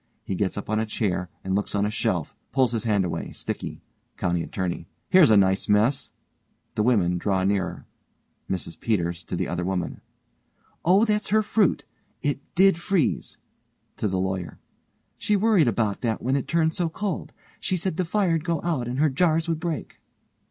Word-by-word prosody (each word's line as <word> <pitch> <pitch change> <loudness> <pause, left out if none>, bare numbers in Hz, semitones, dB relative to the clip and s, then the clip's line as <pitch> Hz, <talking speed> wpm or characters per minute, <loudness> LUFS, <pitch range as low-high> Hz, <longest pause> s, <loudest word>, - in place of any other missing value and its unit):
He - - -3
gets 95 +1 -1
up 100 - -5
on 110 0 +1
a 110 - -1
chair 95 -5 -1
and 95 - -2
looks 100 +1 0
on 100 0 +2
a 105 - -1
shelf. 100 -8 -1 0.2
Pulls 130 -3 +3
his 115 0 -2
hand 105 -4 +2
away, 85 - -3
sticky_.) - - -5 0.4
COUNTY 85 -1 0
ATTORNEY: 85 -2 -3 0.2
Here's 185 -7 +7
a 110 - +6
nice 95 0 +2
mess. 115 +7 +3 0.6
(The - - 0
women 95 -7 +2
draw 95 0 +1
nearer.) 95 -3 -1 0.6
MRS 90 -3 -4
PETERS: 85 -6 -1
(to - - -4
the - - -1
other 90 - -2
woman) 90 -1 -2 0.8
Oh, 190 +6 +5
her 210 0 +2
fruit; 210 -3 +2 0.4
it 145 -1 0 0.2
did 190 -2 +5
freeze, 175 -4 0 0.6
(to - - 0
the 95 -1 -1
LAWYER) 95 -2 -3 0.6
She 210 - +2
worried 205 - +4
about 110 -4 0
that 115 -3 0
when 130 +3 0
it 140 - -1
turned 160 -1 +2
so 170 -1 0
cold. 195 +1 -3 0.3
She 185 - -1
said 175 -1 -2
the 185 - +2
fire'd 170 -3 +1
go 170 -2 0
out 155 -9 -1
and 125 +1 -3
her 155 +2 +4
jars 165 +2 +2
would 165 -2 -1
break. 165 -3 -4
120 Hz, 180 wpm, -25 LUFS, -, 0.8 s, Here's